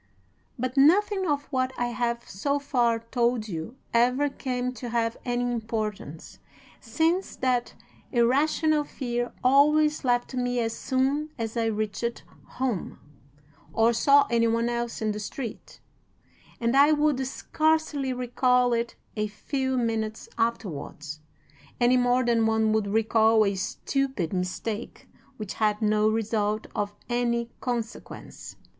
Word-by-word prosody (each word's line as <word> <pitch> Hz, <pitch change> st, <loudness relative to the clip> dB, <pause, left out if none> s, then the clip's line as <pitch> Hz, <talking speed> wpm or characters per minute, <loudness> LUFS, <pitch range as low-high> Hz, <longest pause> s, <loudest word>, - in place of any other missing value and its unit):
But 255 Hz, +2 st, -3 dB
nothing 380 Hz, +6 st, +4 dB
of 290 Hz, -2 st, 0 dB
what 255 Hz, 0 st, 0 dB
I 245 Hz, 0 st, 0 dB
have 235 Hz, 0 st, -2 dB
so 280 Hz, +9 st, -1 dB
far 245 Hz, -5 st, +1 dB
told 235 Hz, 0 st, -1 dB
you 175 Hz, +5 st, -6 dB, 0.2 s
ever 250 Hz, +5 st, +3 dB
came 250 Hz, -2 st, -3 dB
to 245 Hz, 0 st, -7 dB
have 230 Hz, -1 st, 0 dB
any 245 Hz, -1 st, 0 dB
importance, 220 Hz, -9 st, -4 dB, 0.4 s
since 325 Hz, +11 st, 0 dB
that 250 Hz, -2 st, 0 dB, 0.4 s
irrational 295 Hz, +5 st, +2 dB
fear 245 Hz, -4 st, -3 dB
always 300 Hz, +4 st, +4 dB
left 245 Hz, 0 st, +1 dB
me 245 Hz, -1 st, -1 dB
as 225 Hz, -1 st, -1 dB
soon 275 Hz, +3 st, 0 dB
as 225 Hz, -1 st, -4 dB
I 230 Hz, -1 st, +1 dB
reached 215 Hz, +2 st, -2 dB, 0.3 s
home, 250 Hz, -7 st, -2 dB, 0.8 s
or 225 Hz, +1 st, +3 dB
saw 280 Hz, +5 st, +5 dB
any 230 Hz, -1 st, +3 dB
one 230 Hz, +1 st, +1 dB
else 235 Hz, -1 st, -3 dB
in 215 Hz, -, +1 dB
the 210 Hz, -, -4 dB
street, 225 Hz, +2 st, -7 dB, 0.8 s
and 235 Hz, +2 st, +1 dB
I 285 Hz, +2 st, +6 dB
would 295 Hz, -3 st, +2 dB
scarcely 310 Hz, -1 st, 0 dB
recall 250 Hz, 0 st, +2 dB
it 235 Hz, 0 st, -1 dB, 0.2 s
a 215 Hz, -1 st, -1 dB
few 260 Hz, +5 st, -2 dB
minutes 220 Hz, -2 st, -2 dB
afterwards, 160 Hz, -9 st, -3 dB, 0.6 s
any 245 Hz, +1 st, +4 dB
more 245 Hz, 0 st, +2 dB
than 230 Hz, -2 st, +3 dB
one 220 Hz, -1 st, +2 dB
would 215 Hz, -2 st, +1 dB
recall 220 Hz, +1 st, +3 dB
a 200 Hz, -, +1 dB
stupid 215 Hz, -, -2 dB
mistake 190 Hz, +5 st, -4 dB, 0.3 s
which 210 Hz, -3 st, -5 dB
had 210 Hz, -1 st, +1 dB
no 215 Hz, -1 st, +3 dB
result 215 Hz, -1 st, -1 dB
of 205 Hz, 0 st, -3 dB
any 235 Hz, -1 st, 0 dB
consequence. 235 Hz, -2 st, -6 dB
240 Hz, 130 wpm, -26 LUFS, 220-260 Hz, 0.8 s, I